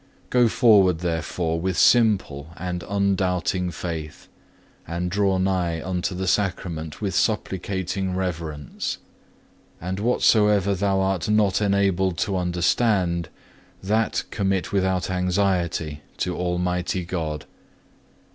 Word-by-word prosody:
4. 125 - +3
Go 120 - +6
forward 105 -7 +5
therefore 80 -1 -2
with 90 +1 -2
simple 100 - +3
and 90 -1 -4
undoubting 95 -2 0
faith, 80 -2 -6 0.6
and 85 +2 -3
draw 100 -1 +2
nigh 90 -3 0
unto 90 +2 -2
the 95 +1 -3
Sacrament 90 -5 -2
with 100 -3 -1
supplicating 95 -2 -1
reverence. 80 -6 -4 0.8
And 95 +3 -4
whatsoever 105 -3 +3
thou 95 0 +1
art 95 0 0
not 105 -2 +3
enabled 95 -3 +1
to 100 - -1
understand, 90 -1 +1 0.5
that 110 +3 +1
commit 95 -3 -1
without 95 -2 0
anxiety 90 -4 0 0.2
to 90 - -2
Almighty 90 0 -1
God. 80 -4 -4
95 Hz, 110 wpm, -24 LUFS, 85-100 Hz, 0.8 s, Go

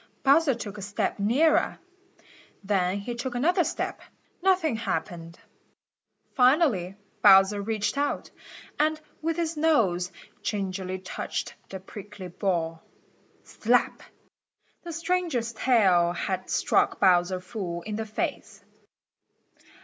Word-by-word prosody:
Bowser 280 0 +4
took 210 -3 -7
a - - -7
step 200 +1 -2
nearer. 265 +11 +2 0.9
Then 190 -1 +1
he 240 +4 -5
took 245 +1 -5
another 345 +8 +2
step. 325 - -3 0.4
Nothing 365 -8 +2
happened. 170 -6 -4 1.0
Finally 250 - +3 0.3
Bowser 195 0 +6
reached 215 +4 -1
out, 290 0 -2 0.5
and 310 +1 +2 0.2
with 325 +1 -1
his 335 -1 -1
nose 215 - +2 0.3
gingerly 190 -2 -3
touched 185 0 -5 0.2
the 190 - -6
prickly 195 0 -10
ball. 165 -3 -2 0.6
Slap! - - +1 0.8
The 345 - -7
stranger's 330 -8 -1
tail 190 -8 +3
had 185 +1 -3
struck - - +1
Bowser 185 -1 +3
full 180 -4 -5
in 210 -1 -5
the 220 0 -4
face. 215 - -4
210 Hz, 110 wpm, -26 LUFS, 185-285 Hz, 1.0 s, Bowser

